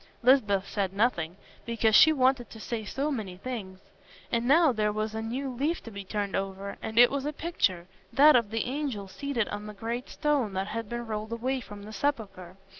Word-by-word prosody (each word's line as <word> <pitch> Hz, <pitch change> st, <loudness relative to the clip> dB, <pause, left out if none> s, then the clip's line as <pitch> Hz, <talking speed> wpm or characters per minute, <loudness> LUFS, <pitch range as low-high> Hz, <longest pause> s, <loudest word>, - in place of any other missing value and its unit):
Lisbeth 210 Hz, -7 st, +4 dB
said 195 Hz, -2 st, -2 dB
nothing, 195 Hz, -6 st, 0 dB, 0.3 s
because 230 Hz, -1 st, +1 dB
she 315 Hz, -, +8 dB
wanted 260 Hz, -4 st, +2 dB
to 220 Hz, -, -11 dB
say 225 Hz, 0 st, -4 dB
so 275 Hz, +7 st, -2 dB
many 205 Hz, -9 st, -4 dB
things. 200 Hz, -4 st, -6 dB, 0.5 s
And 235 Hz, 0 st, 0 dB
now 315 Hz, +2 st, +6 dB
there 215 Hz, -3 st, 0 dB
was 215 Hz, +1 st, -2 dB
a 220 Hz, -, -3 dB
new 255 Hz, +5 st, -3 dB
leaf 295 Hz, +7 st, -1 dB
to 230 Hz, -, -9 dB
be 200 Hz, -1 st, -7 dB
turned 200 Hz, 0 st, -3 dB
over, 195 Hz, +1 st, -3 dB
and 220 Hz, -, -6 dB
it 245 Hz, 0 st, +8 dB
was 280 Hz, -1 st, -2 dB
a 295 Hz, -, -1 dB
picture—that 205 Hz, -, +2 dB
of 235 Hz, -4 st, +3 dB
the 225 Hz, 0 st, -1 dB
angel 255 Hz, -7 st, -3 dB
seated 245 Hz, +1 st, -2 dB
on 205 Hz, 0 st, -5 dB
the 210 Hz, -, -8 dB
great 235 Hz, +5 st, -4 dB
stone 290 Hz, -9 st, 0 dB
that 190 Hz, +2 st, -2 dB
has 230 Hz, +1 st, -3 dB
been 240 Hz, +2 st, -4 dB
rolled 215 Hz, 0 st, -4 dB
away 260 Hz, +3 st, -1 dB
from 205 Hz, -3 st, -10 dB
the 215 Hz, +1 st, -9 dB
sepulchre. 195 Hz, -8 st, -3 dB
225 Hz, 200 wpm, -28 LUFS, 200-260 Hz, 0.5 s, she